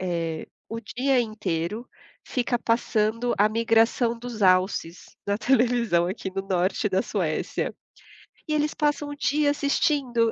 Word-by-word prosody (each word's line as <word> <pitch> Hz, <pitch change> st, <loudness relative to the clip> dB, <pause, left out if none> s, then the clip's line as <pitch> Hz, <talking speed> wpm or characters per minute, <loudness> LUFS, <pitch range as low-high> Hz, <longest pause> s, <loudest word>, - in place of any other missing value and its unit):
eh, 165 Hz, -3 st, -2 dB, 0.2 s
o 225 Hz, -, -4 dB
dia 250 Hz, +4 st, +1 dB
inteiro, 210 Hz, -1 st, -3 dB, 0.4 s
fica 245 Hz, -1 st, -1 dB
passando 230 Hz, 0 st, 0 dB
a 210 Hz, +1 st, +4 dB
migração 230 Hz, +1 st, +2 dB
dos 230 Hz, -3 st, -6 dB
alces, 185 Hz, -2 st, +2 dB, 0.2 s
na 200 Hz, -, +1 dB
televisão 235 Hz, -6 st, +2 dB
aqui 190 Hz, +1 st, -4 dB
no 195 Hz, 0 st, -2 dB
norte 190 Hz, +2 st, +1 dB
da 190 Hz, 0 st, +1 dB
Suécia. 170 Hz, -7 st, -2 dB, 0.7 s
E 305 Hz, -, -1 dB
eles 300 Hz, 0 st, +1 dB
passam 295 Hz, -1 st, 0 dB
o 290 Hz, -, -6 dB
dia 290 Hz, 0 st, +1 dB
assistindo, 280 Hz, -5 st, +1 dB
225 Hz, 135 wpm, -25 LUFS, 190-245 Hz, 0.7 s, a